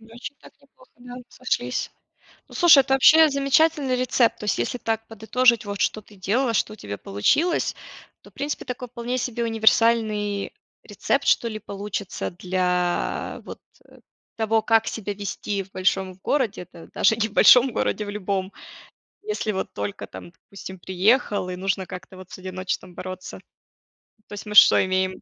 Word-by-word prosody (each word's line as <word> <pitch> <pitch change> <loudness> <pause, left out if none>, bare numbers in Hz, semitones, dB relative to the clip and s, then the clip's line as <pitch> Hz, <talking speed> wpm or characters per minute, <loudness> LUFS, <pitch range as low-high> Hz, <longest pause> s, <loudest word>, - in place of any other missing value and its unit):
Значит 235 +5 -10
так - - -17
неплохо, 275 -2 -24
да, 245 0 -11
сошлись. 125 - -3 0.6
Ну, - - -14
слушай, 345 -5 +7
это 270 0 +1
вообще 315 +4 +7
замечательный 280 0 +2
рецепт. 250 -1 +1
То - - -8
есть 210 - 0
если 120 - -2
так 225 -1 -3
подытожить, 225 +2 +2
вот 200 -1 -6
что 215 - 0
ты 210 0 -19
делала, 230 +6 0
что 215 - 0
у - - -10
тебя 100 - -7
получилось, 295 - 0 0.5
то, - - -17
в - - -41
принципе, 290 +2 -4
такой 250 -1 -6
вполне 245 +1 -4
себе 240 -1 -2
универсальный 220 -2 +1 0.3
рецепт, - - -2
что 235 - +3
ли, 215 -1 -6
получится 200 -1 -5
для 180 0 -2
вот, - - -10 0.3
э, - - -19 0.4
того, 220 0 +1
как 225 0 +2
себя 210 -2 -4
вести 200 0 -4
в 190 - -18
большом 185 0 0
городе. 255 -10 -1
Это 175 -1 -14
даже 220 - +3
не 220 0 0
в - - -18
большом 250 +4 +6
городе, 215 - -1
в - - -5
любом. 195 -1 -3 0.7
Если 420 - -2
вот 190 -2 -4
только 100 0 -5
там, 95 - -11
допустим, 190 +2 -11
приехал 200 +2 +1
и 180 - -4
нужно 190 0 -2
как-то 185 +1 -10
вот 185 -1 -12
с - - -8
одиночеством 185 0 -5
бороться. 185 0 -8 0.9
То - - -11
есть 205 - -7
мы 210 - -6
что - - +8
имеем? 185 0 -1
210 Hz, 170 wpm, -23 LUFS, 185-245 Hz, 0.9 s, что